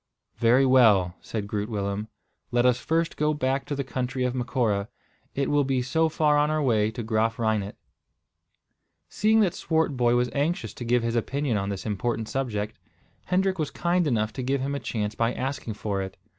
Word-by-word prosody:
"Very 120 +4 +4
well," 110 -9 +5
said 105 -3 -4
Groot 105 +1 -3
Willem. 100 0 -2 0.4
"Let 120 0 +2
us 125 -1 +4
first 165 +4 0
go 150 0 +1
back 135 -1 -1
to 145 - -2
the 140 - -2
country 130 0 -3
of 125 -1 0
Macora. 120 -5 0 0.5
It 140 -1 0
will 145 -1 +3
be 130 -2 0
so 160 +6 +1
far 150 -1 +2
on 150 +1 +2
our 155 0 +1
way 110 -7 +2
to 115 +2 -5
Graaf 110 +1 0
Reinet." 110 -3 -1 1.3
Seeing 220 +1 +3
that 190 -5 +2
Swartboy 135 -7 +1
was 125 0 +1
anxious 140 - -1
to 120 - -7
give 120 0 +2
his 115 0 -1
opinion 135 +2 -1
on 100 -1 -1
this 100 -2 -5
important 110 +2 -2
subject, 110 -5 -3 0.5
Hendrik 190 0 +1
was 155 - 0
kind 175 -1 0
enough 110 -5 0
to 130 - -4
give 135 +2 0
him 140 +1 -2
a 140 - -2
chance 105 -4 -3
by 115 +2 0
asking 130 -4 -3
for 100 -2 -2
it. 95 0 -6
125 Hz, 190 wpm, -26 LUFS, 110-140 Hz, 1.3 s, well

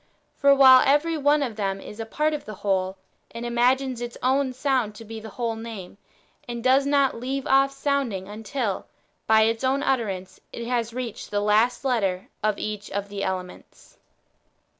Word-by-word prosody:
For 280 -1 +5
while 260 -2 +8
every 295 +4 +2
one 295 0 +3
of 230 -5 -4
them 195 -2 -1
is 210 +2 -10
a 225 - -5
part 305 +6 0
of 300 - -4
the 215 - -7
whole, 190 -1 -1 0.3
it 230 +1 -7
imagines 245 +1 +1
its 240 0 -6
own 265 +1 +2
sound 255 -5 0
to 225 - -11
be 220 +1 -7
the 220 0 -9
whole 230 +1 -3
name, 220 -4 -8 0.5
and 235 -1 -5
does 265 +2 +4
not 280 -4 +2
leave 265 +2 -3
off 275 +1 +4
sounding 275 -9 -1
until, 215 0 -4 0.4
by 220 0 +6
its 225 +2 0
own 270 +2 +1
utterance, 200 -8 -2
it 235 - -6
has 235 -1 -1
reached 240 -2 -6
the 205 - 0
last 215 +6 +2
letter 200 -8 0
of 215 -1 +1
each 210 -1 -5
of 200 0 -4
the 200 -1 -5
elements. 185 -1 -6
235 Hz, 180 wpm, -25 LUFS, 210-270 Hz, 0.5 s, while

